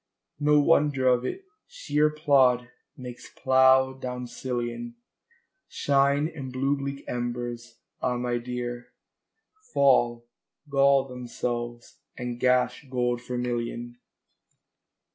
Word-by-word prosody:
No 150 0 +4
wonder 145 -3 +3
of 125 -1 +3
it: 385 - -5 0.2
shéer 155 - +1
plód 135 -5 +3 0.3
makes 125 -1 -9
plough 130 0 +4
down 125 -1 -5
sillion 125 - -4 0.7
Shine, 140 +1 +2
and 140 -6 -7
blue 135 +2 0
bleak 140 0 -5
embers, 120 -1 -4 0.2
ah 125 -1 0
my 120 0 -1
dear, 120 0 -5 0.8
Fall, 120 -4 +3 0.4
gall 140 -1 +3
themselves, 120 -1 -5 0.2
and 125 -1 -5
gash 125 +2 +1
gold 125 -1 0
vermillion. 120 -1 -4
125 Hz, 100 wpm, -26 LUFS, 120-140 Hz, 0.8 s, No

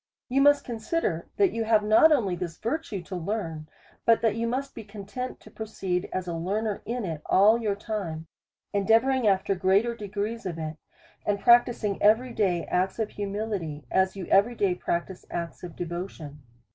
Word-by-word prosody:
You 270 +2 +2
must 290 0 +5
consider, 220 - -2
that 395 -3 +4
you 230 - -2
have 215 -1 +4
not 220 +9 +6
only 210 -11 +2
this 170 -2 -5
virtue 230 - -3
to 185 - -7
learn, 165 -4 -4 0.3
but 230 -1 +4
that 225 -2 +2
you 230 +1 -1
must 270 +3 -2
be 225 - -8
content 210 +5 -6
to - - -15
proceed 190 -5 -3
as 185 -1 -2
a 170 - -2
learner 200 +5 -2
in 235 -1 -2
it 160 -4 -4
ail 215 +4 +6
your 210 -3 0
time, 195 -7 -4 0.5
endeavouring 225 +5 +3
after 195 0 +2
greater 195 +5 +2
degrees 210 +1 -4
of 170 -3 -4
it, 155 -1 -5 0.5
and 205 -1 0
practising 235 -3 +4
every 225 +4 +4
day 180 -6 +1
acts 185 +1 0
of 220 -2 -2
humility, 200 -7 -4
as 190 0 +2
you 190 -2 -5
every 205 +7 +3
day 195 -4 +2
practise 180 +1 -3
acts 170 -1 -5
of 175 -2 -8
devotion. 170 -4 -6
205 Hz, 175 wpm, -27 LUFS, 180-230 Hz, 0.5 s, not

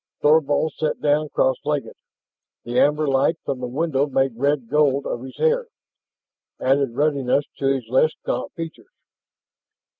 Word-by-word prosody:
Thorvald 150 0 +3
sat 155 - -1
down 150 +1 +1
cross 130 -2 +1
legged. 150 -1 -2 0.7
The 120 +1 -1
amber 150 +1 +3
light 135 +4 +2
from 135 -2 -2
the 125 - -4
window 145 +1 0
made 135 -3 0
red 140 0 0
gold 140 0 +2
of 120 - -3
his 130 0 -10
hair, 475 0 +1 0.9
added 135 -2 +1
ruddiness 140 -1 +1
to 135 - 0
his 135 -4 0
less 130 +6 +3
gaunt - - -2
features. 165 -1 -8
140 Hz, 145 wpm, -22 LUFS, 130-150 Hz, 0.9 s, Thorvald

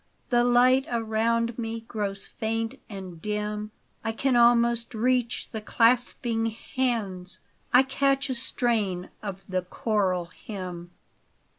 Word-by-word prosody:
The 240 0 +5
light 250 +2 +5
around 230 0 0
me 225 0 -3
grows 205 -3 -4
faint 225 +3 -3
and 185 -5 -8
dim. 210 +1 -2 0.3
I 225 - 0
can 260 +2 +1
almost 235 -1 +4
reach 245 +1 0
the 220 - -4
clasping 230 0 +2
hands, 215 -6 -2 0.3
I 250 +2 +7
catch 275 +1 +1
a 260 - -1
strain 225 -7 -1
of 195 -2 -6
the 185 -1 0
choral 185 -1 0
hymn. 180 -1 -7
225 Hz, 120 wpm, -27 LUFS, 200-240 Hz, 0.3 s, I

